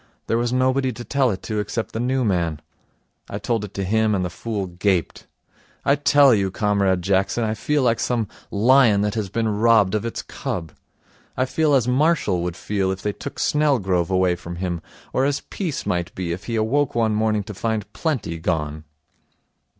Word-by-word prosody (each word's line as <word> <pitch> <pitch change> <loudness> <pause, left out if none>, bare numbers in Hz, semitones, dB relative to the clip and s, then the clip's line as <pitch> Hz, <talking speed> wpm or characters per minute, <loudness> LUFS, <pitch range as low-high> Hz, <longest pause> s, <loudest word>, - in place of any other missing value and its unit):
There 115 - +1
was 120 0 0
nobody 130 +1 +2
to 120 +2 -8
tell 135 0 +1
it 95 -4 -4
to 110 -2 -2
except 110 +2 -3
the 110 - -4
new 130 +1 0
man. 85 -6 0 0.7
I 100 - -4
told 115 +1 -1
it 105 -1 -8
him, 105 +2 +1
and 90 -2 0
the 90 - -4
fool 110 -4 -3
gaped. 90 -2 -1 0.6
I 140 - +5
tell 145 -2 +5
you, 100 -3 +1
Comrade 100 -2 +1
Jackson, 100 +4 +1
I 110 -1 0
feel 145 +6 0
like 115 -2 +2
some 120 -4 0 0.2
lion 115 -1 +4
that 105 0 0
has 110 -4 -2
been 115 +3 -1
robbed 110 -4 +4
of 110 -1 0
its 115 - -4
cub. 80 -3 -5 0.7
I 130 - +2
feel 150 +2 +2
as 125 -3 +2
Marshall 125 - +2
would 85 -1 -3
feel 100 -2 -1
if 95 0 -5
they 105 - -1
took 140 - -8
Snelgrove 100 - +1
away 95 -1 +2
from 85 0 -8
him, 85 -2 -3 0.3
or 130 - +2
as 140 +1 0
Peace 170 -8 -3
might 90 -1 -1
if 90 +1 -3
he 115 - -3
awoke 125 +6 +1
one 110 -2 +2
morning 110 -1 +1
to 105 - -8
find 110 +1 -2
Plenty 125 - -2
gone. 80 -2 -2
105 Hz, 190 wpm, -22 LUFS, 95-125 Hz, 0.7 s, I